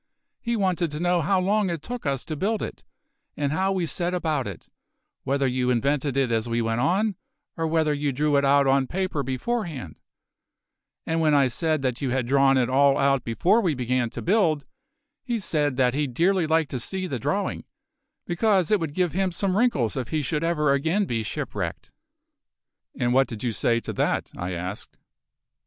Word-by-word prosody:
He 235 0 -2
wanted 185 -5 0
to 150 +1 -6
know 175 0 +2
how 185 +5 +2
long 200 +1 +1
it 165 -3 -4
took 245 -9 -5
us 135 -2 -1
to 155 - -4
build 210 +7 -1
it, - - -7 0.5
and 140 -1 0
how 190 +5 +1
we 185 -3 0
set 175 +4 -2
about 155 -8 -1
it, 100 -4 -8 0.6
whether 140 +1 +1
you 125 -1 0
invented 140 +3 0
it 135 -3 +1
as 115 +1 0
we 115 0 0
went 115 0 0
on, 195 - +2 0.4
or 165 0 -1
whether 160 -1 +2
you 145 0 -1
drew 145 +2 +1
it 140 - +3
out 140 0 +4
on 135 0 +3
paper 185 -3 -2
beforehand; 140 - -3 1.1
and 165 0 0
when 155 -2 +3
I 140 -2 +5
said 155 +2 -1
that 130 0 -1
you 135 - -1
had 130 -1 0
drawn 135 +1 +4
it 125 -2 +2
all 135 +2 +4
out 135 -2 +2
before 180 - +2
we 170 -7 0
began 125 -1 0
to - - -7
build, 175 -7 +2 0.6
he 240 -2 -1
said 150 - -1
that 125 -2 +3
he'd 140 -3 -2
dearly 180 +1 +2
like 160 -1 +2
to 130 - -3
see 185 +9 -3
the 140 -9 -3
drawing, - - -2 0.6
because 190 0 +1
it 210 - +4
would 160 -3 -4
give 180 -3 +1
him 190 +1 0
some 185 +2 -1
wrinkles 200 - +1
if 125 -3 -3
he 155 +2 -1
should 150 +3 -1
ever 150 -4 +2
again 160 +9 +1
be 115 -8 -2
shipwrecked." 110 - -4 1.1
"And 120 0 +1
what 135 +1 +4
did 110 -3 -7
you 120 - 0
say 115 +2 +1
to - - -5
that?" - - -1
I 90 +1 -4
asked. 90 +4 -6
150 Hz, 195 wpm, -25 LUFS, 130-180 Hz, 1.1 s, I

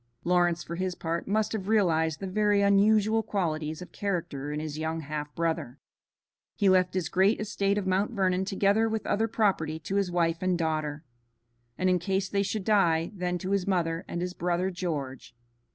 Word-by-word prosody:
Lawrence 175 -1 +2
for 170 - -6
his 185 0 -2
part 165 +1 -3
must 215 +2 0
have 195 -3 -3
realized 160 -7 +2
the - - -5
very 205 +1 +2
unusual 210 +2 +4
qualities 160 -6 -2
of - - -14
character 165 -8 -3
in 150 - -3
his 155 -1 -5
young 160 +1 -2
half 150 0 -5
brother. 160 -6 -2 0.8
He 200 -3 +3
left 185 -1 +3
his 180 -4 0
great 190 +5 +3
estate 200 -1 0
of 205 - -1
Mount 190 +2 +1
Vernon 190 -4 +1
together 200 +3 +2
with 220 0 -3
other 225 +2 +1
property 195 -8 0
to 195 +5 -2
his 200 -2 +1
wife 170 -1 +1
and 185 -1 +1
daughter, 155 -2 -2 0.7
and 185 - +1
in 180 -1 +3
case 190 +2 -1
they 200 - +1
should 200 +1 -2
die 170 -6 +2
then 180 -2 -2
to 185 +2 -4
his 195 -2 0
mother 170 -3 0
and 175 - -4
his 180 0 -3
brother 180 +2 -1
George. 145 -10 -5
180 Hz, 185 wpm, -28 LUFS, 165-200 Hz, 0.8 s, unusual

